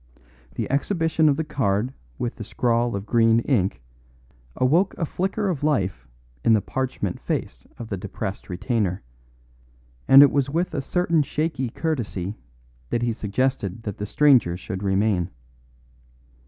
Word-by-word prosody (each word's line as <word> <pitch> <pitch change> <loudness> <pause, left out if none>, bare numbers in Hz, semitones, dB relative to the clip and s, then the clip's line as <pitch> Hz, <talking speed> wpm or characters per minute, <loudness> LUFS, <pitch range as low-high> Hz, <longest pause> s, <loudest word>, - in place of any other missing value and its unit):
The - - -2
exhibition 160 +1 +2
of 140 - +2
the 160 - 0
card 125 -5 -1 0.2
with 120 - -3
the 110 - -5
scrawl 120 +1 0
of 100 0 -4
green 115 0 +4
ink 95 - 0 0.7
awoke 165 +10 +2
a 165 - 0
flicker 195 +6 -2
of 160 -7 -2
life 95 - 0 0.4
in 115 - +5
the 110 - +5
parchment 130 -8 -3
face - - -4
of 115 -2 -8
the 100 - -2
depressed 95 +2 -6
retainer, 95 0 -1 1.0
and 135 +1 +10
it 145 - +5
was 140 -1 +1
with 170 +5 -1
a 140 - -1
certain 170 +2 +1
shaky 150 -3 -2
courtesy 110 - -3 0.5
that 120 - -1
he 120 -1 +1
suggested 110 -1 -2
that 105 -4 -5
the 105 - -3
strangers 125 -11 +4
should 95 0 -5
remain. 95 -2 +1
120 Hz, 145 wpm, -24 LUFS, 100-145 Hz, 1.0 s, and